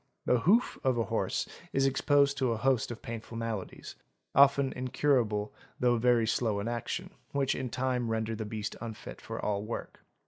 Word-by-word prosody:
the 125 - +3
hoof 210 - +3
of 130 -3 +2
a 115 - +2
horse 115 0 -1 0.3
is 135 0 +3
exposed 140 +1 +3
to 130 -3 +1
a - - -3
host 130 0 +1
of 120 -1 -7
painful 115 0 -6
maladies—often 130 +5 0
incur 130 +2 +2
able 105 -2 -3 0.3
though 120 -2 +3
very 120 -1 +4
slow 110 -2 0
in 100 - -3
action, 145 +10 -3 0.2
which 140 -1 +1
in 130 -1 -3
time 125 -1 -1
render 110 0 -1
the 110 - -4
beast 105 0 -4
unfit 115 -2 -7
for - - -6
all 100 -1 -1
work. 110 +3 -6
120 Hz, 175 wpm, -30 LUFS, 110-135 Hz, 0.3 s, very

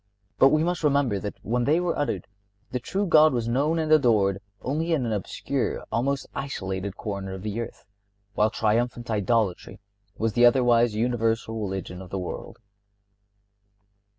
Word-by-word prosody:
But 135 - +7
we 155 +2 +3
must 175 0 -1
remember 140 -8 +2
that 105 +1 -5
when 120 +2 0
they 155 +4 +3
were 175 -1 0
uttered 145 - -2 0.5
the 125 - -1
true 195 +11 -2
God 155 -4 +6
was 120 -2 -1
known 140 +7 +1
and 155 -1 -1
adored 110 -10 +4 0.2
only 160 +6 -1
in 140 -6 +1
an 115 - -2
obscure, 105 -3 -2
almost 135 +4 0
isolated, 95 -8 -4
corner 100 -3 -5
of 95 0 -7
the 105 +2 -3
earth, 115 - -8 0.5
while 105 +1 +3
triumphant 115 +2 0
idolatry 105 -2 0 0.4
was 110 -1 0
the 120 - +3
otherwise 120 -2 +4
universal 115 -1 0
religion 95 -2 -4
of 95 - -10
the 95 - -4
world. 90 -1 -6
115 Hz, 155 wpm, -25 LUFS, 105-140 Hz, 0.5 s, But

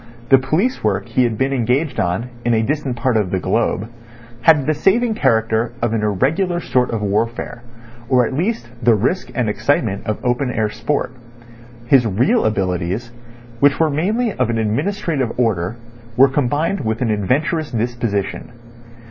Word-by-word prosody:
The 135 - +7
police 165 - 0
work 105 +1 -1
he 125 +2 +2
had 115 -2 -2
been 135 +3 0
engaged 130 +4 0
on 100 +8 -1
in 120 -1 +2
a 110 - +2
distant 140 0 -2
part 120 0 0
of 105 -4 0
the 95 - -1
globe 100 +3 0 0.5
had 150 +1 +5
the 155 - +2
saving 220 +9 +2
character 115 - +1
of 120 -1 0
an 110 - 0
irregular 150 - 0
sort 125 -6 0
of 110 -2 -3
warfare 115 +4 -2 0.5
or 125 -2 +4
at 115 - -4
least 175 - -1
the 120 -2 +4
risk 125 - -1
and 125 -3 0
excitement 105 -2 0
of 110 - -1
open 125 +2 0
air 110 -3 -1
sport. 145 +3 -2 0.7
His 120 -1 +4
real 125 - +2
abilities, 95 +2 -1 0.5
which 140 +1 +4
were 160 -2 +3
mainly 210 +10 0
of - - 0
an 115 - 0
administrative 130 - -1
order, 110 -5 0 0.4
were 135 +2 +7
combined 145 +8 0
with 110 0 -2
an 115 - 0
adventurous 145 - 0
disposition. 115 -3 -3
120 Hz, 165 wpm, -19 LUFS, 110-145 Hz, 0.7 s, The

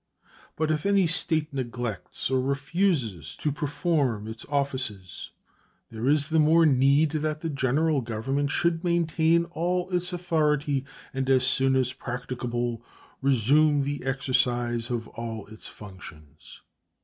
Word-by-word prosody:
But 155 0 0
if 155 -1 -1
any 200 -2 +4
State 160 -3 0
neglects 120 -3 -4
or 130 -1 +2
refuses 135 - -1
to 150 - -1
perform 145 - -1
its 110 +1 -8
offices 130 -10 -3 0.6
there 115 +2 -3
is 150 +1 +2
the 160 0 +3
more 160 +2 +5
need 140 +2 +4
that 155 0 -2
the 165 - -2
General 140 +2 +1
Government 130 +5 -2
should 170 +2 0
maintain 170 -1 +2
all 180 +2 -1
its 180 0 -1
authority 150 -6 0 0.3
and 135 0 -2
as 130 -1 +4
soon 135 0 +3
as 130 -1 +1
practicable 120 -2 -4 0.4
resume 140 +3 +3
the 145 0 -3
exercise 125 -3 0
of 115 -2 -3
all 115 -2 -6
its 110 +1 -11
functions. 80 -7 -13
140 Hz, 130 wpm, -26 LUFS, 120-155 Hz, 0.6 s, more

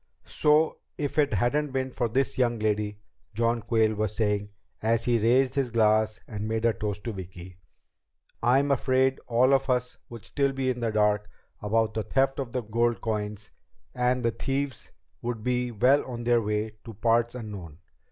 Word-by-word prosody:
"So 155 +1 +2 0.2
if 145 +1 -2
it 145 -6 +2
hadn't 135 +7 0
been 130 0 -1
for 120 -1 -1
this 130 +4 0
young 120 -2 +2
lady," 105 -1 -1 0.4
John 115 +1 +1
Quayle 110 -1 +2
was 105 -1 -2
saying 105 -2 0 0.3
as 115 +1 +1
he 120 -1 +2
raised 125 +4 +3
his 135 -3 0
glass 110 -1 +2
and 105 -1 -5
made 110 +1 -1
a 115 - +4
toast 105 -1 -4
to 115 - -4
Vicki, 90 -1 -9 0.8
"I'm 135 +4 +3
afraid 130 0 +2
all 125 +3 +4
of 135 0 +2
us 125 0 0
would 115 -3 -10
still 140 -1 0
be 130 -1 0
in 125 - -5
the 115 -1 0
dark 105 -1 +1 0.3
about 110 +1 +1
the 110 - -1
theft 135 +6 +1
of 130 -4 -4
the 125 0 -2
gold 115 +2 0
coins, 105 -2 -4 0.4
and 125 0 +1
the 115 - +2
thieves 135 +1 -3 0.3
would 115 -2 -4
be 125 0 0
well 125 +5 +3
on 120 -2 -6
their 120 0 +3
way 105 0 -2
to 115 - -10
parts 115 +3 +1
unknown. 100 -10 -8
115 Hz, 180 wpm, -27 LUFS, 110-130 Hz, 0.8 s, a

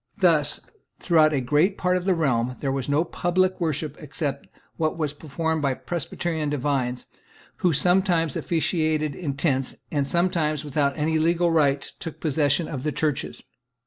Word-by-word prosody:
Thus, 155 -7 +3 0.4
throughout 160 -3 +4
a 145 - +1
great 150 +10 +2
part 180 0 +1
of 180 -1 -2
the 190 -2 +3
realm, 125 -6 0
there 135 - -1
was 135 0 -2
no 145 +3 +3
public 185 +2 0
worship 155 -2 -2
except 140 -1 -4 0.3
what 155 0 -1
was 150 -3 -1
performed 160 +2 -2
by 135 -2 +1
Presbyterian 165 -1 -3
divines, 130 -3 -1 0.5
who 180 - +2
sometimes 175 0 +2
officiated 155 -3 0
in 145 -3 -4
tents, 135 -3 0 0.2
and 145 -3 0
sometimes, 155 -3 +1
without 140 -1 0
any 155 +1 +1
legal 170 +1 +2
right, 145 -4 +3 0.2
took 165 -3 -6
possession 150 +1 +1
of 135 -5 -5
the 150 +2 -1
churches. 150 -2 -2
155 Hz, 155 wpm, -24 LUFS, 140-170 Hz, 0.5 s, throughout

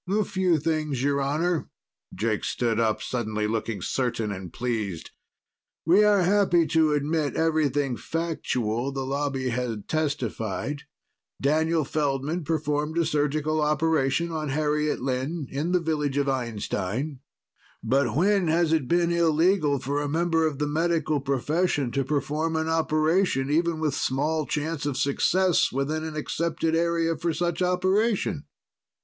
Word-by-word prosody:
"A 210 +2 +2
few 185 -3 +1
things, 155 -4 -1
Your 140 0 +1
Honor." 155 +4 0 0.4
Jake 110 +2 -1
stood 115 -2 0
up, 110 -2 +1
suddenly 110 -3 -2
looking 110 -3 -2
certain 115 -5 -1
and 95 -3 -7
pleased. 110 -8 -3 0.7
"We 185 +6 +5
are 205 -3 +4
happy 180 -3 +3
to 160 -2 +3
admit 150 0 0
everything 145 -5 +1
factual 135 -7 -2
the 135 -1 -3
Lobby 135 -1 -1
had 115 -4 -3
testified. 140 -3 -2 0.6
Daniel 160 +2 +1
Feldman 145 +3 -1
performed 150 0 -1
a 170 - +3
surgical 150 +1 0
operation 150 +1 +1
on 155 -2 -3
Harriet 150 -1 0
Lynn 135 +4 -2
in 150 +6 -2
the 180 - +3
village 150 -4 -1
of 140 -1 +1
Einstein. 120 +1 -2 0.6
But 135 +5 +1
when 195 +3 +3
has 165 0 +2
it 155 -6 +1
been 170 +3 +2
illegal 165 -2 +3
for 140 +3 -2
a 145 - -2
member 165 +1 +2
of 150 -3 -4
the 150 - 0
Medical 155 0 0
profession 140 +1 0
to 135 - 0
perform 150 +4 -1
an 160 0 0
operation, 160 -2 +1
even 165 +1 +1
with 155 -3 0
small 150 +3 0
chance 150 0 -2
of 140 -3 -2
success, 180 +6 +2
within 145 +4 -1
an 160 -1 -5
accepted 165 +1 -1
area 165 0 +1
for 165 0 -2
such 175 0 -1
operation? 185 -1 +1
150 Hz, 140 wpm, -26 LUFS, 135-165 Hz, 0.7 s, We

